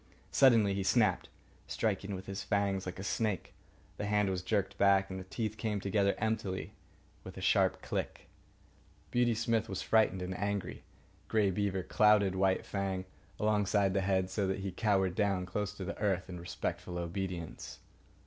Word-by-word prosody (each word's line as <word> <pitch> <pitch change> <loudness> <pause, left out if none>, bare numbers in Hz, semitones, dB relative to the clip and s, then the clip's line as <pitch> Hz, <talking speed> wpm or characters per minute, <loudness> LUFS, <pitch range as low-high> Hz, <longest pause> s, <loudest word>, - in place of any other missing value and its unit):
Suddenly 115 -7 +5
he 100 - -1
snapped, 95 0 +2 0.4
striking 100 -2 -1
with 95 - -8
his 95 0 -5
fangs 100 -2 0
like 90 - -5
a 95 - -6
snake. 105 -2 -1 0.4
The 105 - -3
hand 105 -1 +2
was 90 -1 -2
jerked 100 +1 -1
back, 95 -1 +4
and 95 - -4
the - - -6
teeth 110 +2 -3
came 110 -3 -1
together 100 0 +1
emptily 110 -4 -2 0.5
with - - -10
a - - -6
sharp - - +2
click. - - -4 0.8
Beauty 120 -1 +2
Smith 115 -1 0
was 95 - -3
frightened 105 -4 +3
and 90 +1 -4
angry. 100 -1 -2 0.5
Grey 105 -3 +2
Beaver 95 -1 -1
clouted 105 -1 +4
White 95 0 +1
Fang 95 -2 -2 0.3
alongside 105 -2 +2
the 100 - +1
head, 95 -1 +1
so 95 0 0
that 95 0 -2
he 95 0 -3
cowered 95 -2 +1
down 95 -2 0
close 100 +2 -2
to 95 - -6
the - - -4
earth 95 -3 0
in 90 - -6
respectful 85 +1 -4
obedience. 85 -1 -5
100 Hz, 170 wpm, -32 LUFS, 95-105 Hz, 0.8 s, Suddenly